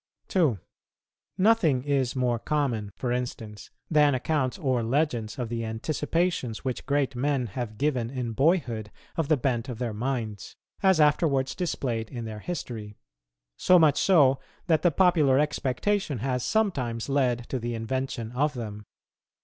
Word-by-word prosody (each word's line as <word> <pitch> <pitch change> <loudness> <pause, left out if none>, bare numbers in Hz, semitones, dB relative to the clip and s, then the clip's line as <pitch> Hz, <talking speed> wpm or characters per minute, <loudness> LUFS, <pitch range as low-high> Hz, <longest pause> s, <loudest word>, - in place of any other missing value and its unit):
2. 155 - +2 0.8
Nothing 185 - +3
is 135 -2 0
more 125 -2 +1
common, 120 -8 -1
for 125 - -3
instance, 120 -4 -4 0.2
than 150 -3 +4
accounts 130 0 -1
or 130 -7 0
legends 120 -3 -1
of 125 -2 -2
the 115 0 -3
anticipations, 140 +3 -2
which 130 -2 -3
great 140 -2 +1
men 135 0 0
have 110 0 -5
given 130 -5 0
in 125 -3 -3
boyhood 120 - +1 0.3
of 165 -4 -1
the 155 -1 +3
bent 125 -1 -1
of 120 - -5
their 120 -2 -3
minds, 110 -3 -4 0.3
as 190 -4 +4
afterwards 145 -3 +3
displayed 125 - -2
in 120 -4 -6
their 110 -1 -6
history; 110 -8 -6 0.6
so 180 - +5
much 155 -4 +4
so 140 -8 +5 0.3
that 160 -3 +2
the 175 - +4
popular 160 -5 +4
expectation 150 - 0
has 125 +1 -1
sometimes 135 - 0
led 125 -4 +1
to 130 - -2
the 120 0 -3
invention 120 0 -3
of 145 +4 0
them. 105 -3 -6
130 Hz, 150 wpm, -27 LUFS, 115-150 Hz, 0.8 s, so